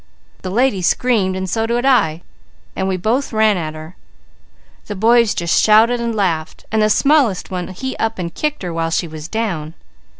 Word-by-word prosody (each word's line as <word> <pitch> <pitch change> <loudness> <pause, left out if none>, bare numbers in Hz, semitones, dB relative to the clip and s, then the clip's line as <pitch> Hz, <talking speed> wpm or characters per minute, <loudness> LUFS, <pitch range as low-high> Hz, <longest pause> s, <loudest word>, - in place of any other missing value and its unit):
_ - - -28
The 185 - -5
lady 220 -1 +1
screamed, 195 -1 +1
and 190 0 -3
so 225 +4 -1
did 240 +2 -1
I, 175 -12 +2 0.5
and 190 - -2
we 190 -1 -1
both 230 +9 -1
ran 220 -2 +3
at 155 -3 -4
her. 155 +4 -10 0.9
The 205 - -5
boys 230 +2 +3
just 170 -1 +1
shouted 225 +3 +4
and 235 -1 -2
laughed 165 -6 -2
and 220 0 +1
the 215 - +3
smallest 270 -7 +2
one 180 -1 -3
he 260 +8 -5
up 225 0 -2
and 170 -2 -5
kicked 300 -6 -3
her 175 -2 -4
while 165 0 -1
she 165 +1 -1
was 155 -1 -8
down. 175 -8 -3
205 Hz, 195 wpm, -18 LUFS, 175-235 Hz, 0.9 s, shouted